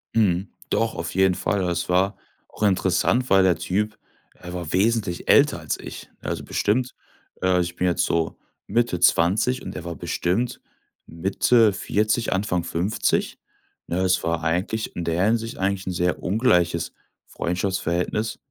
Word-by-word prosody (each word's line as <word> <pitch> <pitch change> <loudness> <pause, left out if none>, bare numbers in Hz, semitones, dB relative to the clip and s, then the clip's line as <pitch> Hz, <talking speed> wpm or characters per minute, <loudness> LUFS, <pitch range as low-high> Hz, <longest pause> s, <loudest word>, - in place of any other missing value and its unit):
Mhm. 95 -3 +2 0.2
Doch, 115 0 0
auf 85 0 -4
jeden 95 -1 +4
Fall. 100 +1 -1
Es 85 +1 -2
war 95 +2 +2 0.3
auch - - -7
interessant, 100 +5 +2
weil 95 -1 +5
der 90 -2 +3
Typ 105 +3 -1 0.4
er 90 0 -8
war 85 -4 -5
wesentlich 100 -2 0
älter - - +5
als - - -3
ich, - - -9
also, - - -4
bestimmt, 125 +5 0 0.5
äh 95 -1 +3
ich 85 0 -2
bin 90 - 0
jetzt 85 - +1
so 85 -1 -1 0.3
Mitte 120 -7 +1
20 105 +9 +3
und - - -7
er - - -6
war 85 -1 -5
bestimmt 110 +8 -1 0.5
Mitte 100 +6 +3
40, 110 +4 0
Anfang 95 -3 0
50, 85 +5 -1 0.5
ne? 85 - -2
Es 95 0 +2
war 85 -1 -1
eigentlich 90 +7 -1
in 85 - -3
der 85 +3 +1
Hinsicht 115 +1 0
eigentlich 95 0 -1
'n - - 0
sehr 90 0 0
ungleiches 90 -5 +1 0.3
Freundschaftsverhältnis. 90 +3 -2
95 Hz, 150 wpm, -23 LUFS, 85-105 Hz, 0.5 s, weil